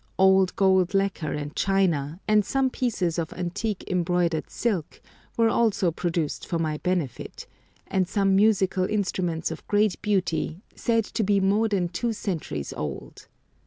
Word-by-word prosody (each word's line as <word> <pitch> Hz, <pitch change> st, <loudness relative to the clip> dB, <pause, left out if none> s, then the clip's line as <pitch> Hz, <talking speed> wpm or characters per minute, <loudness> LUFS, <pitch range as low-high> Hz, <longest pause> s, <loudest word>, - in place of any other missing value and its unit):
Old 190 Hz, 0 st, +4 dB
gold 190 Hz, -2 st, +3 dB
lacquer 195 Hz, -6 st, 0 dB
and 150 Hz, 0 st, -4 dB
china, 175 Hz, -6 st, +1 dB
and 215 Hz, -1 st, +4 dB
some 265 Hz, +5 st, 0 dB
pieces 185 Hz, -11 st, -1 dB
of 160 Hz, -2 st, -3 dB
antique 180 Hz, +4 st, -3 dB
embroidered 175 Hz, -2 st, 0 dB
silk, 200 Hz, -10 st, -2 dB, 0.4 s
were 230 Hz, -1 st, +4 dB
also 210 Hz, -7 st, +2 dB
produced 165 Hz, -2 st, -2 dB
for 170 Hz, -, -1 dB
my 155 Hz, -2 st, -1 dB
benefit, 180 Hz, -8 st, -3 dB, 0.4 s
and 185 Hz, -2 st, 0 dB
some 195 Hz, -1 st, +2 dB
musical 195 Hz, -3 st, +3 dB
instruments 185 Hz, -5 st, -1 dB
of 160 Hz, -, -8 dB
great 205 Hz, -2 st, +2 dB
beauty, 180 Hz, -3 st, -1 dB
said 230 Hz, -2 st, +1 dB
to -, -, -3 dB
be 200 Hz, 0 st, +3 dB
more 200 Hz, +4 st, +2 dB
than 195 Hz, -5 st, 0 dB
two 230 Hz, +6 st, -2 dB
centuries 160 Hz, -, -4 dB
old. 75 Hz, -3 st, -6 dB
185 Hz, 145 wpm, -25 LUFS, 170-205 Hz, 0.4 s, Old